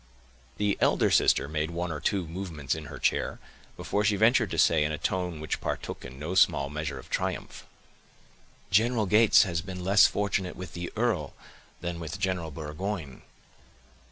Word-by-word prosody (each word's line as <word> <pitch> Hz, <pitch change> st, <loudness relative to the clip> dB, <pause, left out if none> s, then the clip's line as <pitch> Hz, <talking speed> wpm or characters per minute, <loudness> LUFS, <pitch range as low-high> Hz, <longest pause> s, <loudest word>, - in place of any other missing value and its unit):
The 105 Hz, -1 st, 0 dB
elder -, -, +3 dB
sister -, -, +4 dB
made 75 Hz, +1 st, -2 dB
one 85 Hz, 0 st, -3 dB
or 75 Hz, -, -4 dB
two 95 Hz, +2 st, 0 dB
movements 80 Hz, -6 st, -4 dB
in 80 Hz, -1 st, -6 dB
her -, -, -8 dB
chair, -, -, 0 dB, 0.4 s
before 105 Hz, -, -1 dB
she 105 Hz, -1 st, +3 dB
ventured 115 Hz, +1 st, +4 dB
to -, -, -4 dB
say, 80 Hz, -2 st, +4 dB
in 75 Hz, -, -1 dB
a 75 Hz, -, -2 dB
tone 90 Hz, -1 st, -2 dB
which 80 Hz, -, -3 dB
partook -, -, -4 dB
in 65 Hz, -, -10 dB
no 75 Hz, +5 st, -4 dB
small 70 Hz, -6 st, +3 dB
measure 75 Hz, 0 st, -4 dB
of -, -, -11 dB
triumph,— -, -, -3 dB, 1.0 s
"General 110 Hz, +2 st, +3 dB
Gates 105 Hz, +3 st, +6 dB
has 85 Hz, -4 st, -2 dB
been 90 Hz, 0 st, -7 dB
less 95 Hz, +2 st, +6 dB
fortunate 100 Hz, -3 st, -1 dB
with 95 Hz, -, -8 dB
the 85 Hz, 0 st, -5 dB
earl, 105 Hz, -, -1 dB, 0.5 s
than 85 Hz, 0 st, -4 dB
with 80 Hz, +1 st, -5 dB
General 95 Hz, -5 st, -1 dB
Burgoyne." 80 Hz, +1 st, -5 dB
90 Hz, 170 wpm, -28 LUFS, 80-100 Hz, 1.0 s, Gates